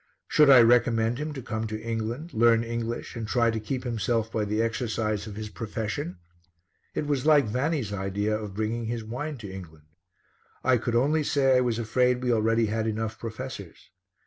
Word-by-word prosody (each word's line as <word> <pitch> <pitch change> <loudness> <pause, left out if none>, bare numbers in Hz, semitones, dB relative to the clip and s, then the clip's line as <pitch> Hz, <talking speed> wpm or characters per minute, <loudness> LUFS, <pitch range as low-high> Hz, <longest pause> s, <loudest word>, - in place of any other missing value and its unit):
Should 150 -2 +5
I 130 -3 +9
recommend 115 0 +3
him 150 +1 -3
to 135 -3 -7
come 110 -1 -3
to 110 0 -4
England, 115 +8 -4
learn 115 0 +4
English 115 +1 -4
and 115 -2 -4
try 115 0 +2
to 110 - -2
keep 125 +4 -4
himself 115 -2 -1
by 110 -1 -1
the 105 +1 -1
exercise 110 -2 -1
of 105 - -7
his 110 0 -5
profession? 105 -5 -4 0.8
It - - -1
was 145 -1 -1
like 150 -4 +6
Vanni's 125 0 -1
idea 100 +2 -1
of 105 -3 -6
bringing 110 +2 -2
his 115 0 -3
wine 135 +7 -5
to 110 -4 -8
England. 80 -5 -10 0.8
I 130 -1 +4
could 120 0 -2
only 145 +6 +3
say 135 -2 +3
I 125 - +4
was 120 -3 0
afraid 125 +2 +1
we 125 -1 +2
already 115 +1 +2
had 110 +1 -1
enough 110 0 -3
professors. 115 -5 -8
115 Hz, 185 wpm, -27 LUFS, 110-125 Hz, 0.8 s, I